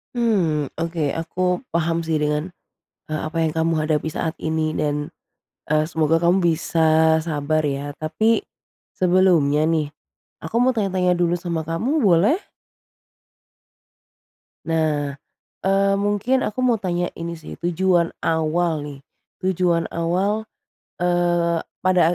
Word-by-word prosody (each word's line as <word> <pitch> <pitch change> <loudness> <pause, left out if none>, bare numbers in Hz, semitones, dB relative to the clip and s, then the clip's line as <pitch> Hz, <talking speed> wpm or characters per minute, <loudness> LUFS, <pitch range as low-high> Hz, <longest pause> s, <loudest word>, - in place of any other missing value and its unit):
Mmm, 175 - +1
oke, 165 -1 -2
aku 180 +2 -1
paham 170 0 0
sih, 160 -1 0
dengan, 150 +2 0 0.6
eee, 155 - -1
apa 165 - -6
yang 155 - +1
kamu 165 +1 0
hadapi 155 0 0
saat 160 +1 -3
ini 160 0 -1
dan, 150 -1 -2 0.6
eee, 155 0 +2
semoga 160 0 +1
kamu 180 +3 +4
bisa 160 -1 +3
sabar 155 -1 -1
ya. 140 +1 -3
Tapi 215 +9 +1 0.6
sebelumnya 175 -5 +3
nih, 155 -3 0 0.5
aku 160 +8 -5
mau 250 +2 +4
tanya-tanya 190 -5 +1
dulu 175 0 +1
sama 170 -2 -3
kamu, 250 - 0
boleh? 205 - +4 2.3
Nah, 155 -3 0 0.5
eee, 195 +1 +2
mungkin 205 +6 +1
aku 215 - -3
mau 235 -4 +2
tanya 175 -1 -1
ini 170 0 -6
sih, 155 - -10
tujuan 175 0 +2 0.2
awal 160 0 +1
nih, 145 -2 -8 0.4
tujuan 180 -2 +1
awal, 195 +6 0 0.5
eee, 175 -1 +1 0.2
pada 180 -2 +3
170 Hz, 120 wpm, -22 LUFS, 155-185 Hz, 2.3 s, kamu